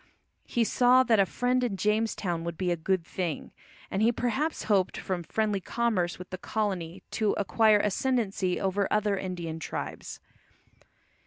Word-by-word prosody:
He 240 - +1
saw 250 +3 +5
that 230 -5 +3
a 195 - +4
friend 250 +4 0
in 220 -6 -1
Jamestown 210 -5 0
would 170 -1 -4
be 180 0 0
a - - +2
good 170 +1 -1
thing, 175 -4 -4 0.4
and 195 - 0
he 225 +2 +5
perhaps 265 +7 -1
hoped 195 -4 +1
from 185 -2 -3
friendly 210 +3 -1
commerce 200 -5 0
with 180 0 -10
the 185 - -5
colony 190 -5 -3
to 215 -2 +1
acquire 215 +1 +4
ascendancy 205 -3 0
over 195 +1 0
other 210 -1 +2
Indian 175 -4 -4
tribes. - - -6
200 Hz, 155 wpm, -28 LUFS, 180-225 Hz, 0.4 s, saw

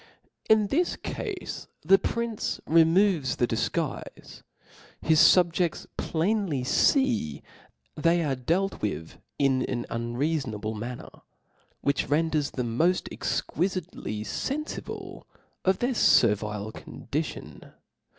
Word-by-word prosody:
In 220 -1 +5
this 345 +5 +1
cafe 405 -4 -5 0.4
the 195 +1 +6
prince 235 -2 -2
removes 165 - +4
the 120 - +2
dif - - -1
guife: - - -5 0.6
his 160 -1 +3
fubjefts 175 -1 +4
plainly 170 - 0
fee 115 - +2 0.5
they 170 +2 +2
are 145 -3 0
dealt 170 +10 -1
with 90 -6 -4 0.2
in 135 -2 +2
an 120 -2 -3
unreafonable 120 -2 -2
manner; 120 +3 -6 0.7
which 140 -2 0
renders 155 -1 +1
them 120 -2 -3
moft 180 +2 +1
exquifitely 175 - -2
fenfible 285 - -5 0.4
of 190 0 +3
their 250 +2 0
fervile 105 - +3
condition. - - -5
160 Hz, 100 wpm, -27 LUFS, 120-190 Hz, 0.7 s, the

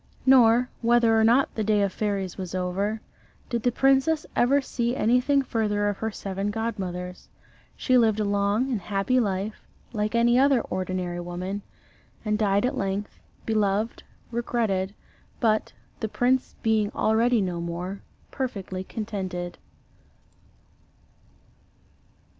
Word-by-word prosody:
Nor 250 -2 +6
whether 235 -1 +4
or 220 - +4
not 240 +5 +4
the 220 - -2
day 210 -1 +2
of 195 -2 -1
fairies 200 -4 -2
was 185 -1 -6
over 195 +4 -1 0.5
did 235 -1 0
the 245 - +2
princess 270 +5 +3
ever 270 +4 +4
see 240 -2 -2
anything 250 +4 +3
further 210 -4 0
of 205 - -3
her 220 - -1
seven 195 -1 -4
godmothers. 185 -5 -4 0.5
She 255 -1 +3
lived 220 -2 +3
a - - +2
long 205 +5 +1
and 225 -5 -1
happy 200 +7 +1
life, 205 -1 -2 0.3
like 215 +1 -1
any 240 +1 +4
other 270 -2 +4
ordinary 185 -2 -3
woman, 180 +3 -4 0.6
and 210 0 0
died 205 0 +2
at 260 +3 -1
length, 195 -1 -3 0.3
beloved, 215 0 0 0.3
regretted, 220 -5 -1 0.4
but, 220 -2 +1 0.3
the 220 - -2
prince 255 +4 +1
being 220 -2 +2
already 230 +2 +3
no 180 -3 -2
more, 175 +3 -5 0.3
perfectly 195 -8 -4
contented. 190 -5 -5
215 Hz, 130 wpm, -26 LUFS, 195-240 Hz, 0.6 s, Nor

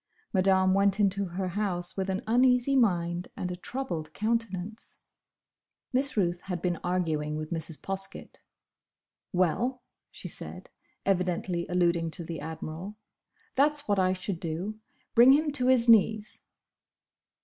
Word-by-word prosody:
Madame 190 -1 +4
went 200 +1 +3
into 200 -1 +2
her 185 +1 -3
house 180 -2 -2
with 195 0 -2
an 190 +3 -2
uneasy 250 +3 +3
mind 175 -7 +1
and 180 - -3
a - - -3
troubled 180 -7 -5
countenance. 220 -2 -3 1.0
Miss 270 0 0
Ruth 175 -3 +1
had 180 -2 -3
been 175 0 -1
arguing 160 -4 -1
with 155 +1 -5
Mrs. 160 -3 -3
Poskett. 195 +2 -5 0.9
"Well," 235 +9 0 0.3
she - - -8
said, - - -7 0.3
evidently 180 -2 0
alluding 170 -2 +1
to 170 - -5
the 165 -1 -5
Admiral, 160 +5 -6 0.6
"That's 290 +1 +2
what 205 -2 +2
I 185 0 +3
should 185 -1 -4
do! 180 +6 -4 0.3
Bring 245 +3 +8
him 300 +1 +2
to 255 -3 0
his 250 -2 +4
knees." 215 -1 +4
190 Hz, 135 wpm, -28 LUFS, 175-225 Hz, 1.0 s, Bring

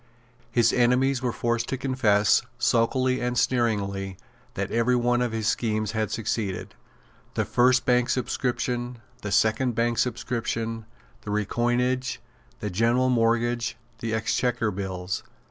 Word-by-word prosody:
His 120 -2 +3
enemies 125 +2 +3
were 125 -2 0
forced 120 0 -1
to 135 - -1
confess, 110 -6 +3 0.2
sulkily 130 +2 +2
and 125 0 -1
sneeringly, 100 -6 0 0.4
that - - -3
every 115 +2 +2
one 120 0 +2
of 120 -2 0
his 110 -2 -2
schemes 110 -1 0
had 110 -2 -1
succeeded, 100 -4 -3 0.6
the - - +1
first 125 +1 +3
Bank 125 0 +3
subscription, 125 0 -1 0.2
the 105 - -4
second 110 +4 +2
Bank 115 0 +1
subscription, 115 -2 -2 0.3
the - - -8
Recoinage, 120 +5 0 0.4
the 105 - -3
General 120 +6 +2
Mortgage, 120 0 +1 0.2
the 115 - -3
Exchequer 115 0 0
Bills. 95 -1 -4
120 Hz, 130 wpm, -26 LUFS, 110-125 Hz, 0.6 s, His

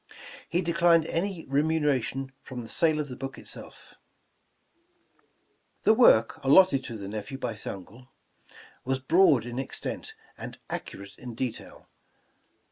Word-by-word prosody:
He 175 +2 +1
declined 170 -1 +4
any 175 0 -2
remuneration 135 -3 0
from 125 -2 -7
the - - -9
sale 155 +5 +2
of 150 - -2
the 125 - -7
book 135 +1 -6
itself. - - -10 1.9
The 220 - +6
work 115 - +5
alloted 140 0 +6
to 115 - -6
the 100 -2 -7
nephew 110 +6 -5
by 125 -3 -3
his 105 - -9
uncle, 105 +7 -8 0.8
was 130 +1 0
broad 140 - +4
in 120 +1 -5
extent, 135 - -5 0.2
and - - -7
accurate 100 0 -6
in 120 -2 -8
detail. 125 -1 -5
135 Hz, 130 wpm, -27 LUFS, 120-160 Hz, 1.9 s, The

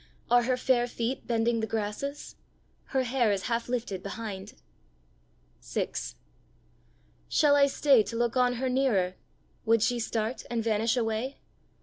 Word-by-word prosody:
Are 245 0 +6
her 250 +1 0
fair 245 -1 +2
feet 240 +2 -3
bending 230 0 +1
the 220 - -1
grasses? 225 +7 -4 0.5
Her 265 -2 0
hair 245 -3 +2
is 195 -2 -1
half 235 -1 -2
lifted 230 -6 -2
behind! 200 -1 -6 1.1
VI. - - -2 1.4
Shall 290 -1 +4
I 280 -1 +6
stay 275 -3 +4
to 230 - -5
look 235 0 0
on 250 -1 +3
her 255 +2 -2
nearer? 250 -9 +1 0.5
Would 225 -1 +3
she 245 0 +1
start 225 +1 -2
and 235 -2 -1
vanish 225 +2 +1
away? 230 +3 -1
235 Hz, 140 wpm, -28 LUFS, 220-255 Hz, 1.4 s, Are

